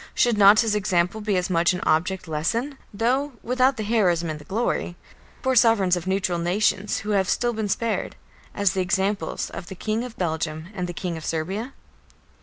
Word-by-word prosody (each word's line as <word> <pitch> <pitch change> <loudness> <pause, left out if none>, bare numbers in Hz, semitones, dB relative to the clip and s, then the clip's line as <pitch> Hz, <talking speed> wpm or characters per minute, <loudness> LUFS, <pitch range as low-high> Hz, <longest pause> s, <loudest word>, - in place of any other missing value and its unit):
Should 240 -2 +3
not 205 +2 +7
his 225 -3 0
example 190 0 0
be 210 -2 0
as 180 - 0
much 170 -1 +2
an 180 - -3
object 180 +3 0
lesson 230 - -2
though 255 +7 0
without 255 +2 +2
the 215 - -2
heroism 180 -7 +1
and 155 - -6
the - - -12
glory 195 -4 -2 0.5
for 260 0 +1
sovereigns 225 -6 +4
of 175 0 -5
neutral 190 -2 0
nations 195 +3 0
who 210 - -4
have 195 -2 +1
still 240 -1 +1
been 220 -2 -3
spared, 230 +3 -1 0.4
as 200 -4 +2
the 190 - 0
examples 195 +2 -1
of 175 - -8
the 190 - -8
King 220 +5 -2
of 250 -2 -8
Belgium 160 -1 -3
and 180 -3 -3
the 175 - -5
King 175 -1 -4
of 160 - -8
Serbia? 190 - -3
195 Hz, 195 wpm, -24 LUFS, 175-225 Hz, 0.5 s, not